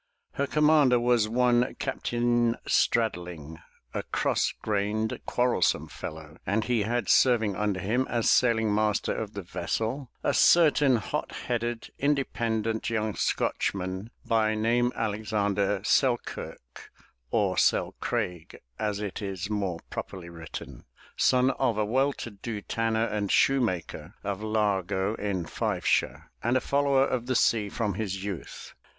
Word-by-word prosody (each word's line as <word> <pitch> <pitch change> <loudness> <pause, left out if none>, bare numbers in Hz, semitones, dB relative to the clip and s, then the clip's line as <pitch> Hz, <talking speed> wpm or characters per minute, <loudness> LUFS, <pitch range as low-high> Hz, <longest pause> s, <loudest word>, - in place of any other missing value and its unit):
Her 140 - -1
commander 150 -5 +4
was 120 -3 +2
one 125 +1 +2
Cap 135 - -4
tain 120 -1 +2
Straddling, 90 -8 0 0.3
a - - -1
cross - - 0
grained, 105 +1 -1
quarrelsome 125 0 +1
fellow, 80 0 -8
and 105 +3 0
he 120 -2 +1
had 120 +4 -1
serving 115 -6 +4
under 105 -2 -1
him 120 +8 0
as 120 -2 0
sailing 110 -4 +3
master 105 0 +1
of - - -4
the - - -5
vessel, 125 +4 -3
a - - +1
certain 150 -5 +5
hot 110 - -3
headed, 120 -1 -2
independent 115 -6 0
young 110 -2 -1
Scotchman, 95 +3 -1 0.2
by 110 -1 +2
name 120 +3 +2
Alexander 105 -2 0
Sel 130 -3 +3
kirk, 65 +1 -9 0.4
or - - +1
Selcraig, 90 -3 -1 0.2
as 105 -2 -1
it 105 -1 -4
is 95 0 -4
more 100 -5 -1
properly 90 -3 -6
written, 80 -2 -9 0.3
son 130 +1 +3
of 120 -5 +1
a 105 - +1
well 135 +6 +2
to 120 - -7
do 105 +2 -6
tarmer 115 0 0
and 105 -3 -2
shoemaker 95 - +1
of 100 0 -3
Largo 105 -2 0
in 95 -4 -2
Fifeshire, - - -1
and 120 +3 +2
a - - +3
follower 140 -1 +2
of 125 -3 -2
the 130 - 0
sea 110 -3 +2
from 105 -1 -2
his 95 -1 -3
youth. 100 -4 -7
110 Hz, 135 wpm, -27 LUFS, 100-120 Hz, 0.4 s, certain